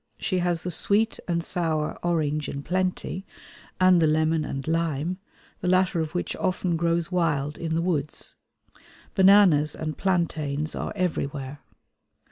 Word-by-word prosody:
She 185 -3 -1
has 175 -2 0
the 180 - -2
sweet 210 +6 +3
and 170 -1 0
sour 160 -3 -1
orange 155 -3 0
in 140 - -5
plenty 185 +2 -2 0.6
and 185 -2 +5
the 160 - +4
lemon 155 +1 +2
and 135 -1 -5
lime, 165 +2 -1 0.4
the - - -3
latter 185 -1 +2
of 160 +1 -3
which 175 - -2
often 180 -2 0
grows 170 +1 0
wild 150 -5 0
in 160 -1 -2
the 165 - 0
woods. 155 -5 -2 0.8
Bananas 190 -7 +5
and 155 -1 -4
plantains 155 -5 0
are - - -4
everywhere. 145 -6 -3
165 Hz, 140 wpm, -25 LUFS, 155-180 Hz, 0.8 s, and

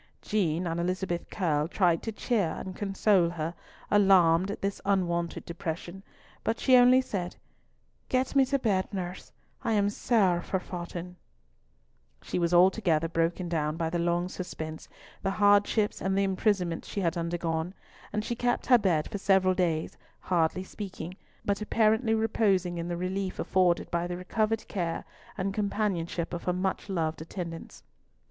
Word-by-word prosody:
Jean 180 -5 0
and 165 0 -2
Elizabeth 180 0 -2
Curll 155 -6 0
tried 175 -2 +2
to 225 - -4
cheer 210 -6 0
and 185 -1 -6
console 195 -3 +2
her, 165 -1 -3 0.4
alarmed 190 -3 +5
at 205 - -4
this 200 0 -2
unwonted 175 -4 0
depression, 170 +2 -5 0.4
but 225 - -1
she 260 - +5
only 250 +1 +7
said, 185 -8 -4 0.7
"Get 255 +1 0
me 275 - +7
to 275 +2 +1
bed, 200 -8 0
nurse, 185 -2 -5 0.3
I 230 - +1
am 205 -1 +2
sair 195 -6 +2
forfaughten." 180 -1 -5 1.1
She - - -2
was 170 -1 +1
altogether 175 -2 +4
broken 165 +2 0
down 155 -2 -1
by 165 -1 -1
the 175 - -1
long 175 +1 +1
suspense, 160 -4 -6 0.3
the - - 0
hardships 205 +1 +3
and 190 0 0
the 200 - +3
imprisonment 190 -3 0
she 200 - -4
had 170 -1 0
undergone, 170 +1 -2 0.4
and 210 +1 -2
she 240 - -2
kept 245 0 0
her 245 -2 +6
bed 170 -7 +1
for 205 - -5
several 190 -1 +3
days, 170 -4 -1 0.2
hardly 175 0 0
speaking, 185 -3 -7 0.3
but 200 +1 0
apparently 220 +1 +2
reposing 195 -6 +1
in 170 - -3
the 175 -1 -3
relief 185 +1 -2
afforded 180 -2 +1
by 170 0 0
the 175 0 -4
recovered 215 +4 -1
care 170 -4 -3 0.3
and 195 +1 -1
companionship 195 -5 -1
of 170 - -5
her 180 - +1
much 190 +2 -2
loved 160 -4 -1
attendants. 165 0 -7
185 Hz, 155 wpm, -28 LUFS, 170-205 Hz, 1.1 s, only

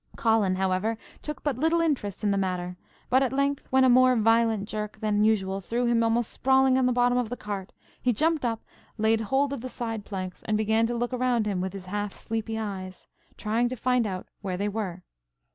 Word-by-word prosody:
Colin, 220 -5 +2
however, 190 +4 0 0.2
took 300 -3 -6
but 275 -5 -1
little 325 +3 +2
interest 260 - -1
in 205 - +2
the - - +2
matter; 180 -1 -2 0.4
but 260 +1 +5
at 265 - +1
length, 280 +1 0
when 265 0 +4
a - - +6
more 255 0 +6
violent 225 -2 +2
jerk 210 -1 -5
than 210 -1 +1
usual 195 -3 +1
threw 235 +6 -1
him 235 -1 +3
almost 230 0 +1
sprawling 265 0 +3
on 260 -1 +3
the - - +2
bottom 245 0 +3
of 240 -3 -2
the 245 - -4
cart, 200 -2 -5 0.3
he 250 - +2
jumped 315 +5 +1
up, 230 -2 -1 0.3
laid 220 +1 +2
hold 270 +5 +1
of 270 - -5
the 255 - -5
side 225 -4 -4
planks, 185 -3 -6
and 215 -1 +2
began 220 +1 +2
to 240 0 -2
look 240 +2 -2
around 250 -3 +1
him 195 -3 -1
with 190 0 -2
his 195 -2 -8
half 205 +1 -3
sleepy 225 0 -4
eyes, 190 -4 -6 0.3
trying 225 +3 0
to 255 - -4
find 250 -1 +1
out 185 -2 -5
where 190 -3 -3
they 200 +2 -1
were. 195 -4 -4
225 Hz, 215 wpm, -27 LUFS, 205-250 Hz, 0.4 s, a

